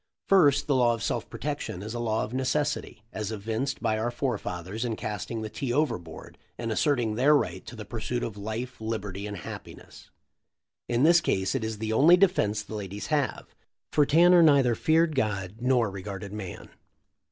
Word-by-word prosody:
First, 160 Hz, -8 st, +5 dB
the 145 Hz, -, +1 dB
law 120 Hz, -2 st, +3 dB
of 115 Hz, -, -7 dB
self -, -, -2 dB
protection 90 Hz, -, -4 dB
is 110 Hz, +2 st, -6 dB
a 120 Hz, -, -4 dB
law 110 Hz, -2 st, 0 dB
of 110 Hz, -, -6 dB
necessity, 135 Hz, -2 st, -1 dB
as 105 Hz, 0 st, -3 dB
evinced 110 Hz, +5 st, -3 dB
by 110 Hz, 0 st, +1 dB
our 115 Hz, +2 st, 0 dB
forefathers 110 Hz, -5 st, -3 dB
in 120 Hz, -2 st, -2 dB
casting 110 Hz, +2 st, -4 dB
the -, -, -3 dB
tea 130 Hz, +3 st, -3 dB
overboard 120 Hz, -, -3 dB, 0.2 s
and 115 Hz, -1 st, -3 dB
asserting 120 Hz, -2 st, +1 dB
their 135 Hz, +7 st, +4 dB
right -, -, -1 dB
to -, -, -8 dB
the -, -, -8 dB
pursuit 120 Hz, 0 st, -3 dB
of 110 Hz, -, -4 dB
life, 110 Hz, +4 st, -5 dB
liberty, 105 Hz, -3 st, -4 dB
and 105 Hz, -1 st, -6 dB
happiness. 85 Hz, -, -10 dB, 0.8 s
In 120 Hz, +2 st, +2 dB
this 170 Hz, +2 st, +6 dB
case 95 Hz, -1 st, 0 dB
it 135 Hz, -, -1 dB
is 110 Hz, -1 st, -3 dB
the 110 Hz, +1 st, -2 dB
only 160 Hz, +9 st, +6 dB
defense 110 Hz, -, +2 dB
the -, -, -10 dB
ladies 100 Hz, -1 st, -5 dB
have, 145 Hz, -4 st, -1 dB, 0.4 s
for 150 Hz, -2 st, +3 dB
Tanner 175 Hz, +3 st, +6 dB
neither 140 Hz, -6 st, +5 dB
feared 160 Hz, +6 st, +2 dB
God 105 Hz, -6 st, -2 dB
nor 125 Hz, -4 st, +2 dB
regarded 100 Hz, +1 st, -7 dB
man. 100 Hz, -4 st, -7 dB
115 Hz, 180 wpm, -27 LUFS, 105-140 Hz, 0.8 s, this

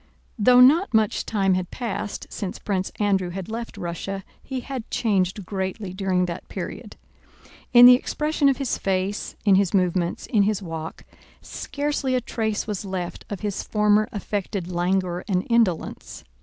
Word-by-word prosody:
Though 250 Hz, +4 st, +6 dB
not 285 Hz, -, +5 dB
much 215 Hz, -2 st, +1 dB
time 195 Hz, -3 st, +2 dB
had 185 Hz, -1 st, -1 dB
passed 220 Hz, -4 st, -4 dB
since 190 Hz, -3 st, -4 dB
Prince 190 Hz, -2 st, -2 dB
Andrew 195 Hz, -3 st, +1 dB
had 185 Hz, +2 st, -6 dB
left 230 Hz, +1 st, -6 dB
Russia, 190 Hz, +3 st, -4 dB, 0.2 s
he 260 Hz, -2 st, -5 dB
had 255 Hz, -3 st, -6 dB
changed 195 Hz, -3 st, 0 dB
greatly 190 Hz, 0 st, -4 dB
during 185 Hz, -1 st, +1 dB
that 175 Hz, 0 st, -6 dB
period. -, -, -6 dB, 0.8 s
In 245 Hz, -1 st, +9 dB
the 250 Hz, -, +11 dB
expression 300 Hz, +3 st, +1 dB
of 270 Hz, -, +1 dB
his 275 Hz, -3 st, -2 dB
face, 195 Hz, +1 st, -2 dB
in 200 Hz, -, +5 dB
his 195 Hz, 0 st, +3 dB
movements, 180 Hz, -2 st, 0 dB
in 215 Hz, -, +2 dB
his 205 Hz, 0 st, +1 dB
walk, 165 Hz, -4 st, -7 dB, 0.4 s
scarcely 285 Hz, -2 st, -2 dB
a -, -, +3 dB
trace 220 Hz, -3 st, -2 dB
was 210 Hz, -3 st, -4 dB
left 185 Hz, -3 st, -5 dB
of 205 Hz, -, -5 dB
his 205 Hz, -2 st, -2 dB
former 210 Hz, +1 st, +2 dB
affected 200 Hz, -4 st, -4 dB
languor 180 Hz, 0 st, 0 dB
and 185 Hz, -2 st, 0 dB
indolence. 225 Hz, -8 st, 0 dB
200 Hz, 155 wpm, -24 LUFS, 185-230 Hz, 0.8 s, the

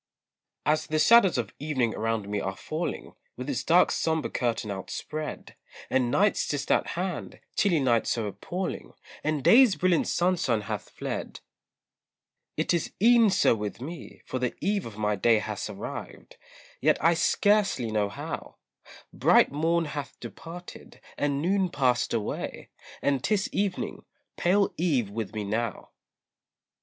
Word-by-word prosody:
As 155 Hz, +1 st, +1 dB
the 155 Hz, -, 0 dB
shadows 195 Hz, -, +6 dB
of 120 Hz, -, -3 dB
evening 130 Hz, -6 st, 0 dB
around 110 Hz, -2 st, -2 dB
me 100 Hz, 0 st, -2 dB
are 95 Hz, 0 st, -3 dB
falling, 160 Hz, +3 st, -4 dB, 0.2 s
With 125 Hz, +2 st, -6 dB
its 140 Hz, -4 st, -2 dB
dark 175 Hz, +2 st, +4 dB
sombre 160 Hz, -2 st, 0 dB
curtain 115 Hz, -3 st, -1 dB
outspread, 150 Hz, +10 st, -6 dB, 0.4 s
And 125 Hz, -2 st, +2 dB
night's 200 Hz, +10 st, +2 dB
just 145 Hz, -1 st, -2 dB
at -, -, +3 dB
hand, 180 Hz, -1 st, -4 dB, 0.2 s
chilly 180 Hz, -6 st, +3 dB
night 120 Hz, -4 st, +2 dB
so 115 Hz, -2 st, 0 dB
appalling, 140 Hz, -, -5 dB, 0.3 s
And 150 Hz, -2 st, -1 dB
day's 240 Hz, -, +7 dB
brilliant 175 Hz, +2 st, +2 dB
sunshine 170 Hz, -11 st, +1 dB
hath 105 Hz, -1 st, -5 dB
fled, -, -, -5 dB, 1.2 s
It -, -, +1 dB
is 170 Hz, -, -1 dB
e'en 230 Hz, +1 st, +6 dB
so 190 Hz, -, +4 dB
with 105 Hz, -1 st, -4 dB
me, 160 Hz, +6 st, -9 dB
for 130 Hz, -, -3 dB
the 125 Hz, -1 st, -1 dB
eve 200 Hz, -, -1 dB
of 110 Hz, -2 st, -11 dB
my 105 Hz, -1 st, 0 dB
day 115 Hz, +3 st, +4 dB
Has -, -, -4 dB
arrived, -, -, -8 dB, 0.5 s
yet -, -, +4 dB
I 165 Hz, +2 st, +4 dB
scarcely 195 Hz, -, +2 dB
know 105 Hz, -2 st, +1 dB
how; -, -, -6 dB, 0.6 s
Bright -, -, +4 dB
morn 165 Hz, +3 st, +1 dB
hath 145 Hz, -1 st, -6 dB
departed, 175 Hz, +2 st, -10 dB, 0.2 s
and 145 Hz, 0 st, -1 dB
noon 190 Hz, +1 st, +2 dB
passed 130 Hz, -6 st, +1 dB
away, 110 Hz, -3 st, -3 dB, 0.3 s
And 140 Hz, -3 st, +1 dB
'tis 210 Hz, -2 st, 0 dB
evening, 195 Hz, -2 st, -2 dB, 0.3 s
pale 195 Hz, +3 st, +2 dB
eve 135 Hz, -, +1 dB
with 110 Hz, 0 st, -5 dB
me 105 Hz, -, -2 dB
now. 110 Hz, +2 st, -3 dB
145 Hz, 145 wpm, -27 LUFS, 115-180 Hz, 1.2 s, day's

